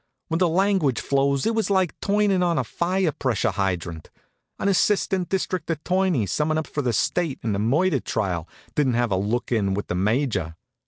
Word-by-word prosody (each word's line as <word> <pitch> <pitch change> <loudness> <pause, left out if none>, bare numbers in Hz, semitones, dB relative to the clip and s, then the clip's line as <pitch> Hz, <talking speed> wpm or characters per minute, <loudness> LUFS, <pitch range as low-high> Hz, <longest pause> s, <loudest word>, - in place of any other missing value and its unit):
When 165 0 0
the 180 -2 +3
language 185 -7 +2
flows 140 0 +1
it 225 - +2
was 220 -2 0
like 190 -4 +2
turnin' 200 -2 +2
on 170 -2 +1
a 135 - +1
fire 175 - 0
pressure 130 -6 0
hydrant. 90 -4 -3 0.5
An - - -1
assistant 190 -1 +1
district 185 -2 -2
attorney 170 - +1
summin' 155 - 0
up 155 - -1
for 145 - -3
the 125 -3 0
State 155 - 0
in 110 -3 0
a - - -2
murder 145 - +2
trial 95 -8 -2 0.2
didn't 135 -5 +1
have 120 -2 +1
a - - +3
look 105 +7 -1
in 100 -5 +1
with 100 - -4
the 90 - -1
Major. 100 - 0
140 Hz, 190 wpm, -24 LUFS, -, 0.5 s, the